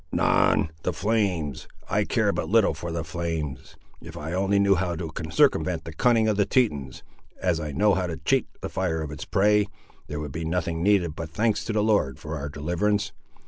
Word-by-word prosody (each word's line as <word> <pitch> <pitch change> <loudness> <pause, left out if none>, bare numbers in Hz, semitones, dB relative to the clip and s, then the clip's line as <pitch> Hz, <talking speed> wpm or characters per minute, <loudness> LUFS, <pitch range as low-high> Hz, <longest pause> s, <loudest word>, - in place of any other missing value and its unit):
"Anan! 80 - +3
the - - -1
flames! 95 - -1 0.2
I - - +1
care - - +2
but - - -3
little - - +4
for 85 - -6
the 85 -1 -2
flames. 80 -5 -4 0.3
If - - -10
I 80 +3 -5
only 95 +2 +1
knew 100 0 +5
how 90 -2 -1
to 80 -1 -5 0.2
circumvent 80 - +2
the 80 - -8
cunning 115 +4 +3
of 105 -2 +1
the 100 - +3
Tetons, 75 - 0 0.4
as 90 -3 +1
I 75 -2 -4
know 100 +7 +3
how 95 -1 0
to 80 -2 -4
cheat - - +1
the - - -4
fire 80 -4 -1
of 75 - -6
its 75 - -7
prey, 105 +1 +3 0.4
there 75 - -4
would 75 -2 -5
be 80 +3 -4
nothing 85 0 -1
needed 90 -5 +2
but 80 -2 -5
thanks 110 +6 0
to 110 - -2
the 105 -1 +2
Lord 100 - +2
for 75 +1 -6
our 70 -1 -4
deliverance. 95 +8 -1
85 Hz, 205 wpm, -25 LUFS, 80-100 Hz, 0.4 s, knew